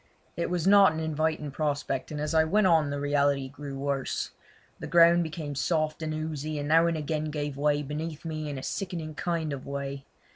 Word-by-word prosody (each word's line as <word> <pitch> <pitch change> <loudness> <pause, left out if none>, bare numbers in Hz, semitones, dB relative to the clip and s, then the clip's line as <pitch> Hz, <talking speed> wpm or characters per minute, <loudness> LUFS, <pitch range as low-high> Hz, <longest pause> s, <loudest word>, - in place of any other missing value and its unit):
It 170 - -2
was 175 -2 -1
not 195 -3 +7
an 160 - -3
inviting 155 -1 -1
prospect, 145 -2 -2
and 150 - -5
as 150 +2 -2
I 160 0 +5
went 200 +6 +2
on 160 -5 +4
the 145 0 -3
reality 140 -1 +1
grew 140 0 -7
worse. 140 -1 -2 0.5
The - - -6
ground 170 0 +6
became 160 -3 -4
soft 155 +3 0
and 155 -1 -2
oozy, 155 -1 -3
and 145 0 -3
now 165 +2 +5
and 165 -1 0
again 155 0 -2
gave 145 -2 -3
way 145 +1 +1
beneath 155 +2 -5
me 155 -2 -4
in 140 - -4
a 130 - -6
sickening 170 -5 -4
kind 160 -2 -2
of 135 - -7
way. 140 0 -4
155 Hz, 205 wpm, -28 LUFS, 145-160 Hz, 0.5 s, not